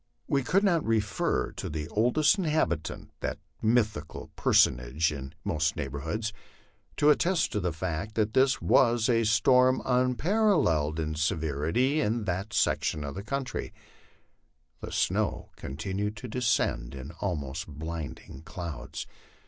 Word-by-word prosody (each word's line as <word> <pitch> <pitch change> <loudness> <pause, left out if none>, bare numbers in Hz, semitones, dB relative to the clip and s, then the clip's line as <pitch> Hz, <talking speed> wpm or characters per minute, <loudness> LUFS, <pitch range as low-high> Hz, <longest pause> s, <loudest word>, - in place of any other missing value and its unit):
We 140 - +2
could 185 +10 +2
not 175 -6 +3
refer 110 -3 0
to - - -6
the 75 0 -4
oldest 125 - +3
inhabitant, 150 - -1
that - - -3 0.2
mythical 110 -9 0
personage 65 +6 +3
in 65 -2 -7
most 80 +2 0
neighborhoods, 80 +10 -3 0.6
to 150 +1 +6
attest 170 +3 +2
to 105 - -1
the 90 -2 -1
fact 85 +5 -4
that 110 -1 +1
this 130 0 +3
was 120 -3 +3
a 115 -2 +3
storm 125 +4 +4
unparalleled 125 - +2
in 80 -1 -2
severity 80 - 0
in 115 -2 0
that 95 +2 -2
section 75 - +1
of 70 +8 -5
country. 135 -1 -3 1.0
The - - -7
snow - - 0
continued 95 +9 -4
to 125 - -7
de 125 +2 -4
scend 80 - 0
in 70 +2 -7
almost 80 -5 -3
blinding 75 -3 -7
clouds. 85 -1 -6
105 Hz, 130 wpm, -28 LUFS, 80-125 Hz, 1.0 s, to